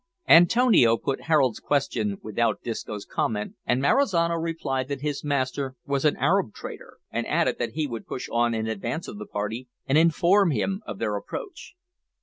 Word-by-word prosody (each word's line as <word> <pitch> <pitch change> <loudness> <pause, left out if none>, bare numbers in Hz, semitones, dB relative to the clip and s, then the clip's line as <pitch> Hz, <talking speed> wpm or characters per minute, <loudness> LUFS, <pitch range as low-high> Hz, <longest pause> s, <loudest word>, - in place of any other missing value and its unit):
Antonio 175 - +6
put 135 - -3
Harold's 135 -8 +3
question 115 -8 -1
without 115 +2 -1
Disco's 105 -3 -5
comment, 105 -2 -2
and 125 - +2
Marizano 170 - +2
replied 160 -6 -2
that 140 -1 -4
his 145 -1 -3
master 135 -2 -1
was 140 0 -1
an 150 - +3
Arab 190 - +1
trader, - - -9
and - - -2
added - - +1
that - - -2
he 155 0 -1
would 115 -5 -6
push 125 - -5
on 120 0 +2
in 110 0 -2
advance 110 - -3
of 105 - -8
the 105 - -7
party 110 +5 -4 0.2
and 135 +3 +3
inform 175 +4 +4
him 190 - -1
of - - -5
their 105 -2 -1
approach. 385 - -8
135 Hz, 170 wpm, -25 LUFS, 115-165 Hz, 0.2 s, Antonio